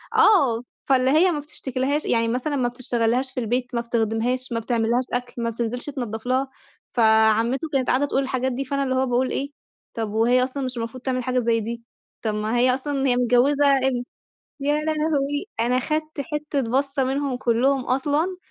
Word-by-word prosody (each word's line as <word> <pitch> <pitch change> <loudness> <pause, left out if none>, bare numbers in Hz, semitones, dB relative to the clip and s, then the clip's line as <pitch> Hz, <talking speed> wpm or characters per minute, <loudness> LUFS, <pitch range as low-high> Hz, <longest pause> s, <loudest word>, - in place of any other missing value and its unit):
آه، 280 - +5 0.3
فاللي 260 -2 +3
هي 340 +5 +5
ما 300 - -2
بتشتكيلهاش 280 0 -2
يعني 230 -1 +2
مثلًا 255 +5 -1
ما 255 -3 +1
بتشتغلّهاش 245 +1 -1
في 255 - -4
البيت، 245 +2 -2
ما 235 - +1
بتخدمهاش، 235 +2 -1
ما 230 - 0
بتعملّهاش 235 +1 0
أكل، 245 -1 -3
ما 230 - 0
بتنزلش 235 +2 -3
تنضّف 240 -6 -5
لها، 260 +2 0 0.4
فعمتو 225 +4 +3
كانت 260 -2 +1
قاعدة 265 +3 +2
تقول 275 -1 0
الحاجات 260 -1 -1
دي 265 +2 -3
فأنا 280 +1 -1
اللي 260 -1 -1
هو 260 0 +2
باقول 255 +1 0
إيه، 280 +1 -2 0.4
طَب 225 -2 -3
وهي 240 +3 +3
أصلًا 270 +2 -3
مش 255 -1 -4
المفروض 230 +2 -5
تعمل 255 -1 -1
حاجة 255 +1 0
زي 230 -1 +1
دي، 230 +2 -5 0.4
طَب 215 -2 -1
ما 215 +3 -1
هي 250 +1 +4
أصلًا 275 0 -2
هي 245 - +3
متجوزة 250 +4 +3
ابن 260 -2 0 0.6
يا 290 +1 +1
لهوي! 305 0 0
أنا 245 +2 +2
خدت 310 +3 -2
حتة 295 0 -2
بصّة 275 +1 +1
منهم 270 0 -1
كلّهم 250 +3 +2
أصلًا، 295 +8 0
255 Hz, 180 wpm, -23 LUFS, 235-275 Hz, 0.6 s, آه